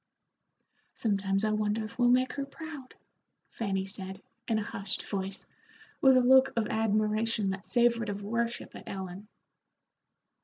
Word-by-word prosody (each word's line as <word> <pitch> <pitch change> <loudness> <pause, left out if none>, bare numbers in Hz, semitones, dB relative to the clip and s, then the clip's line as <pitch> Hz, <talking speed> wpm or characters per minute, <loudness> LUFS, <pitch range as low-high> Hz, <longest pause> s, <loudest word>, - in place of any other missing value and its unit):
"Sometimes 195 -2 +1
I 215 - +1
wonder 215 +1 0
if 230 +3 -11
we'll 245 0 +5
make 255 +1 +3
her 280 - -3
proud," 295 -3 -9 0.6
Fanny 195 -4 -2
said, 190 -1 -7 0.3
in 225 - +2
a 215 - 0
hushed 195 -1 -5
voice, 195 0 -4 0.6
with 265 -1 +7
a - - +6
look 260 +1 +6
of 230 -2 +1
admiration 215 -1 +1
that 190 -1 -6
savored 235 -2 +2
of 200 0 -4
worship 230 +3 -2
at - - -10
Ellen. 190 +1 -6
215 Hz, 145 wpm, -30 LUFS, 195-240 Hz, 0.6 s, with